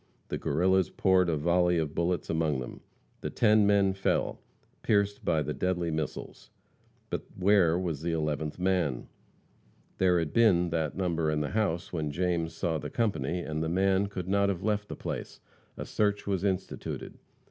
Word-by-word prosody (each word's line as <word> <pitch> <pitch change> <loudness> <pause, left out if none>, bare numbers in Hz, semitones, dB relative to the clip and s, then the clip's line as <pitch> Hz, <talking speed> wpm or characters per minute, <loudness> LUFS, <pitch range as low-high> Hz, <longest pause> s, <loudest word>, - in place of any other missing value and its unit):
The - - -2
Guerrillas 95 +4 +2
poured 95 -2 +3
a 80 - +1
volley 90 +3 +2
of 80 -2 -1
bullets 85 +1 -1
among 80 -4 0
them. 60 - -7 0.4
The - - -4
ten 105 -2 +4
men 100 -1 +3
fell, 95 0 -1 0.4
pierced 100 -1 +1
by 80 -1 +1
the - - -3
deadly 90 -2 -1
missiles. 80 -1 -5 0.6
But - - -3
where 95 -3 +4
was 85 -6 -3
the 85 +1 -1
eleventh 75 -2 -2
man? 90 -8 0 0.9
There 90 -1 +4
had 80 -3 -1
been 90 -7 +4
that 80 -1 -1
number 85 -4 0
in 75 0 0
the 75 - -3
house 90 -7 -1
when 80 -3 -1
James 85 +1 -1
saw 80 -4 -1
the - - -6
company, 90 - -1
and 80 -2 -3
the 80 - -1
man 95 +2 +2
could 95 -3 -6
not 100 +1 +2
have 95 -2 -3
left 105 0 0
the - - -5
place. - - -6 0.4
A - - -5
search 105 -1 0
was 95 -2 -1
instituted. 95 -2 -3
90 Hz, 170 wpm, -29 LUFS, 80-95 Hz, 0.9 s, ten